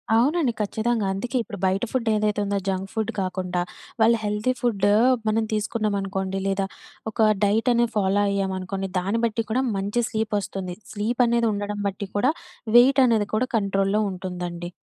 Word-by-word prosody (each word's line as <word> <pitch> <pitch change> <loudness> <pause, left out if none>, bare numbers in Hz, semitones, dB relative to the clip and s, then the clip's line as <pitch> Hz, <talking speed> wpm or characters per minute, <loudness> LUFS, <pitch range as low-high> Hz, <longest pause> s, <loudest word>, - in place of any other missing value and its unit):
అవునండి. 265 +2 +2
ఖచ్చితంగా. 220 +1 0
అందుకే 245 +7 -2
ఇప్పుడు 210 -3 -8
బయట 190 +3 +1
ఫుడ్ 245 -3 -1
ఏదైతే 210 0 0
ఉందో 200 0 0
జంక్ 190 0 -2
ఫుడ్ 220 -2 -1
కాకుండా, 185 -1 -2 0.4
వాళ్ళు 230 +1 +5
హెల్తీ 210 +5 0
ఫుడ్ 210 -5 +1 0.4
మనం 220 +1 +2
తీసుకున్నామనుకోండి. 200 -3 -1
లేదా 195 0 0 0.5
ఒక 215 0 +3
డైట్ 215 +4 +2
అనేది 235 -1 +2
ఫాలో 200 0 +2
అయ్యామనుకోండి, 195 0 -2
దాన్ని 200 +5 -1
బట్టి 230 0 -1
కూడా 255 +4 +2
మంచి 205 +5 0
స్లీప్ 220 -1 -1
ఒస్తుంది 190 -2 -5 0.2
స్లీప్ 225 +4 0
అనేది 235 0 +2
ఉండడం 205 0 -3
బట్టి 195 +1 -6
కూడా, 255 +8 +3 0.5
వెయిట్ 270 +3 +6
అనేది 220 -3 +2
కూడా 255 +4 +1
కంట్రోల్‌లో 195 0 +1
ఉంటుందండి. 180 -2 -5
205 Hz, 155 wpm, -24 LUFS, 195-230 Hz, 0.5 s, వెయిట్